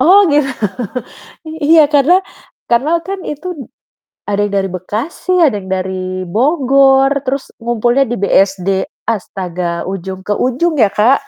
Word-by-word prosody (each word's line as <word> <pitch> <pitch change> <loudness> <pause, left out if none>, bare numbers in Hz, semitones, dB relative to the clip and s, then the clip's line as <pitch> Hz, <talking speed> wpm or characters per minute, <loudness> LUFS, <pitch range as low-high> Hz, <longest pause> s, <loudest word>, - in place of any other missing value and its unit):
Oh, 380 +9 +6
gitu. 290 -1 +3 1.0
I - - -6
iya 315 +1 +6
karena 295 +5 +4 0.5
karena 285 +8 +2
kan 390 -1 -5
itu 300 +4 -6
d 280 - -8 0.6
ada 205 0 -1
yang 200 - -8
dari 195 -1 0
Bekasi, 215 - -3
ada 315 -10 +4
yang 190 - -11
dari 185 0 -3
Bogor, 270 - +3
terus 270 +1 -3
ngumpulnya 240 +3 +1
di 240 - -1
BSD. 195 -1 +1 0.3
Astaga 180 -4 -3
ujung 190 0 -6
ke 205 - -4
ujung 270 +9 0
ya, 220 - +6
Kak. 240 +8 +2
240 Hz, 145 wpm, -15 LUFS, 190-290 Hz, 1.0 s, Oh